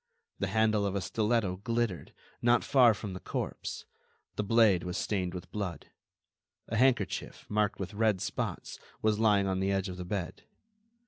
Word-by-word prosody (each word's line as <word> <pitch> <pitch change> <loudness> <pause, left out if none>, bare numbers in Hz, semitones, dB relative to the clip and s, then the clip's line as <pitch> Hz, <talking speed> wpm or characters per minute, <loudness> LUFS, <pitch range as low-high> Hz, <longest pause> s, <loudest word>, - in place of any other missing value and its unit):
The 100 - 0
handle 110 +1 +2
of 100 - -3
a - - +1
stiletto 105 -2 0
glittered, 115 -3 -2 0.3
not 120 0 +4
far 125 -5 +5
from 105 -2 -6
the 90 - -6
corpse; - - -4 0.5
the - - 0
blade 105 -4 +4
was 90 0 -3
stained 95 -3 -1
with 90 - -8
blood. 100 -5 -5 0.8
A 115 - -2
handkerchief, 120 -4 +1
marked 105 -1 0
with 95 +2 -5
red 105 -2 +2
spots, - - -4 0.2
was 110 -1 +2
lying 105 -3 +4
on 95 -1 0
the 95 +1 +1
edge 95 0 0
of 90 - -6
the 90 - -5
bed. 95 -1 -4
105 Hz, 170 wpm, -30 LUFS, 95-110 Hz, 0.8 s, far